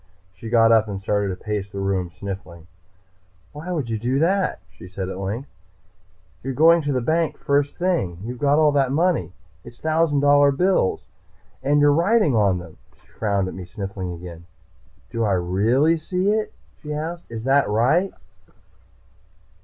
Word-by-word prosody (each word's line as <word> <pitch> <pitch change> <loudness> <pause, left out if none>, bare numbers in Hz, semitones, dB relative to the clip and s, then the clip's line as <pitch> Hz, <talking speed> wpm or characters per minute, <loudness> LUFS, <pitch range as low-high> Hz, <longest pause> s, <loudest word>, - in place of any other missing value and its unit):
She 100 +5 -9
got 115 -1 +5
up 110 -1 +4
and 100 -2 -5
started 100 0 0
to 95 - -3
pace 105 0 -4
the 100 - -9
room, 95 -2 -1
sniffling. 90 -3 -8 0.9
"Why 155 +5 -7
would 155 -8 -2
you 110 -1 -3
do 125 +4 0
that?" 185 +5 +1
she - - -13
said 95 0 -5
at 95 - -6
length. 105 +8 -4 0.9
"You 135 - -5
are - - -2
going 165 +3 +5
to 145 -1 -2
the 130 -2 0
bank, 160 +4 0
first 140 0 0
thing. 170 - -1
You've 120 +2 -6
got 145 0 +3
all 155 -1 +4
that 135 -2 +1
money. 165 - +1 0.3
It's 120 0 -13
thousand 160 -2 +1
dollar 145 0 +5
bills! 180 - +1 0.6
And 145 +2 +2
you're 145 0 +5
writing 170 - +3
on 100 -4 +3
them." 85 -3 -10 0.2
She - - -29
frowned 100 -3 -1
at - - -6
me, 95 - -7
sniffling 95 0 -6
again. 85 -1 -10 0.6
"Do 115 - -1
I 105 -3 +2
really 110 - +2
see 180 +5 -1
it?" 215 0 -1 0.3
she 150 -1 -5
asked. 165 +3 -5
"Is 115 -1 -6
that 135 -1 +3
right?" 135 - +2
125 Hz, 175 wpm, -22 LUFS, 100-155 Hz, 0.9 s, got